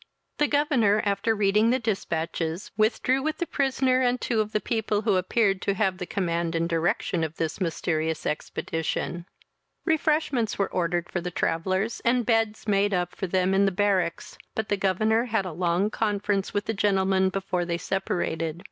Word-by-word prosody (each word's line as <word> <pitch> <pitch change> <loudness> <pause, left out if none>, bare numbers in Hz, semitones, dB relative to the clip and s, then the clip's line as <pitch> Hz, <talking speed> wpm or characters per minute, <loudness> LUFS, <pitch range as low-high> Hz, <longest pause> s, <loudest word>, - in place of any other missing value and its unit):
The 295 - +4
governor, 265 -9 +2
after 205 +2 +1
reading 210 +2 +3
the 255 - +3
dispatches, 170 -6 -2
withdrew 225 +5 +2
with 310 +2 -2
the 345 - -1
prisoner 265 -3 +1
and 250 0 +2
two 225 -3 +1
of 215 0 -4
the 215 - +1
people, 215 -1 -1
who 210 -3 +2
appeared 195 +1 +1
to 200 - 0
have 190 -2 0
the 180 - -4
command 170 -3 -1
and 165 0 +1
direction 170 0 0
of 160 0 -3
this 160 +3 -3
mysterious 160 -2 -1
expedition. 165 +3 -3 0.6
Refreshments 305 - +1
were 200 - 0
ordered 175 -1 -1
for 175 - -3
the 180 - -3
travellers, 185 +6 -1
and 240 0 +2
beds 225 -2 +1
made 200 -1 +2
up 180 0 -1
for 190 - -3
them 185 +1 +1
in 195 +1 +4
the 195 - +2
barracks; 190 -3 0 0.2
but 220 -1 -2
the 205 - +2
governor 215 +4 +1
had 220 -5 0
a 185 - -4
long 175 +5 0
conference 205 -3 -1
with 205 0 -1
the 225 - -1
gentlemen 190 -2 +2
before 190 -2 -2
they 170 -1 -2
separated. 170 -4 -2
195 Hz, 175 wpm, -26 LUFS, 175-220 Hz, 0.6 s, The